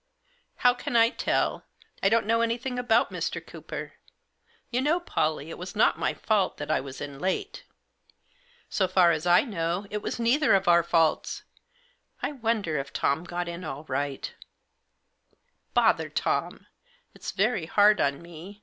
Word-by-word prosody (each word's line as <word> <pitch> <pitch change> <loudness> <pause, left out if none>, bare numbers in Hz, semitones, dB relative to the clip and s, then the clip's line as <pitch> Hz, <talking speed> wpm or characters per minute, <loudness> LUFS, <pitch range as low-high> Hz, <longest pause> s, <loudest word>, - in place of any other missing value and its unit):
" 485 0 -41
"How 245 0 +7
can 245 -1 -5
1 230 0 +5
tell? - - 0 0.4
I 195 - +4
don't 225 -1 +2
know 230 +2 +2
anything 240 +2 -1
about 245 -2 +2
Mr. - - -3
Cooper. - - -8 0.8
You 250 +1 +1
know, 305 +6 +2
Pollie, 155 - -2
it - - -8
was 180 +1 -7
not 210 - +3
my - - 0
fault 210 -4 0
that 145 - -4
I - - +2
was 135 0 -9
in 140 -1 -6
late." 185 +4 -3 0.5
" - - -38 0.3
So 190 - +1
far 180 -2 +5
as 160 +1 -2
I 175 0 +6
know 180 -4 -2
it 210 0 -3
was - - -4
neither 245 +1 +3
of 195 -1 0
our 170 0 +6
faults. 165 -2 +1 0.8
I - - -2
wonder 220 - -1
if 135 - -6
Tom 150 +5 0
got 175 0 -4
in 170 +1 -6
all 150 -2 -6
right" 140 -1 -3 1.4
"Bother - - +3
Tom! - - -2 0.5
Ifs - - -7
very 200 -4 0
hard 210 +3 +5
on 140 +3 0
me. 175 +4 -11
190 Hz, 170 wpm, -27 LUFS, 165-230 Hz, 1.4 s, How